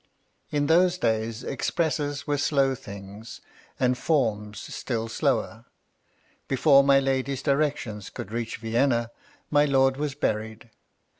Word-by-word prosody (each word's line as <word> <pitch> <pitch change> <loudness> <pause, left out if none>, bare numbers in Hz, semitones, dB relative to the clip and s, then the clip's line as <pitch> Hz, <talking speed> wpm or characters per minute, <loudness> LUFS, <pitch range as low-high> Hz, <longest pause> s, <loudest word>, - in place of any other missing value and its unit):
In 145 -1 0
those 175 +4 +4
days, 110 -3 -1
expresses 145 0 -1
were 145 -1 0
slow 140 -2 +2
things, 100 -1 -10 0.4
and 125 0 +2
forms 110 -9 0 0.2
still 115 -3 -3
slower. 115 -3 -1 0.8
Before 140 +1 +5
my 140 0 +5
lady's 135 0 -1
directions 140 -8 -1
could 100 - -8
reach 115 0 -3
Vienna, 115 +1 0 0.4
my 145 0 +5
lord 135 -1 +3
was 145 -2 -2
buried. 110 -3 -3
135 Hz, 120 wpm, -26 LUFS, 115-145 Hz, 0.8 s, Before